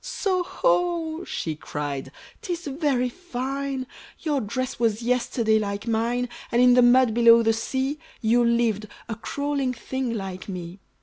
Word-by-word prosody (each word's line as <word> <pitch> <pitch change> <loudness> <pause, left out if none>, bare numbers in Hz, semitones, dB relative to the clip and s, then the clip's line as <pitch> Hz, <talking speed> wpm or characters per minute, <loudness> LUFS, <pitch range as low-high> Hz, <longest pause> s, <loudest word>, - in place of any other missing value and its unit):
"So 390 -7 0
ho!" 345 -6 0
she 160 -2 -3
cried, 145 -2 -5 0.3
"'tis 350 -1 -4
very 275 -3 0
fine! 270 -2 -4 0.4
Your 295 -5 0
dress 255 +4 -3
was 230 -1 +1
yesterday 235 -2 +2
like 200 0 -3
mine; 235 +2 0 0.2
And 235 - +2
in 250 0 +7
the 250 - +6
mud 245 -1 +5
below 235 0 +7
the 225 0 +3
sea, 265 +5 -2 0.2
You 240 +1 +3
lived, 235 -3 +1 0.2
a 230 - -3
crawling 280 +2 -2
thing 255 0 -3
like 190 -2 -6
me. 180 0 -6
245 Hz, 145 wpm, -25 LUFS, 220-275 Hz, 0.4 s, in